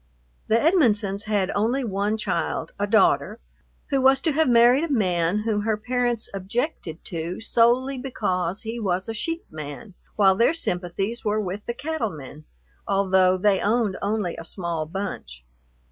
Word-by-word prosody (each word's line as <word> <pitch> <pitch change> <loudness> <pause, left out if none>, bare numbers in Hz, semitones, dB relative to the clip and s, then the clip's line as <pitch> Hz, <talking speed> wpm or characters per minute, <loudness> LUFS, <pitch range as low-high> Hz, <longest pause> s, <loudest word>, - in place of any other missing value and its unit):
The 220 - +3
Edmonsons 215 - +2
had 205 -3 0
only 235 +6 0
one 205 0 -1
child, 210 -3 -2
a 205 - 0
daughter, 205 -2 +3 0.5
who 275 -1 +2
was 265 +1 +5
to 320 - +2
have 310 -1 +2
married 240 +4 +5
a 325 - -5
man 180 -6 +1
whom 215 -2 0
her 215 0 0
parents 240 0 -1
objected 195 - -4
to 170 +1 -4
solely 245 +4 +2
because 190 -8 -2
he 230 +1 -5
was 190 -3 -1
a 225 - -3
sheep 330 +9 -3
man, 155 +6 -8 0.2
while 195 -2 +5
their 235 - +2
sympathies 195 - -2
were 215 0 0
with 200 0 -5
the 235 - -3
cattle 295 -5 -2
men, 150 -2 -11 0.4
although 190 -2 +3
they 195 0 +2
owned 215 -2 +1
only 205 -3 -1
a - - -7
small 165 -2 -3
bunch. 155 - -6
210 Hz, 160 wpm, -24 LUFS, 185-235 Hz, 0.5 s, was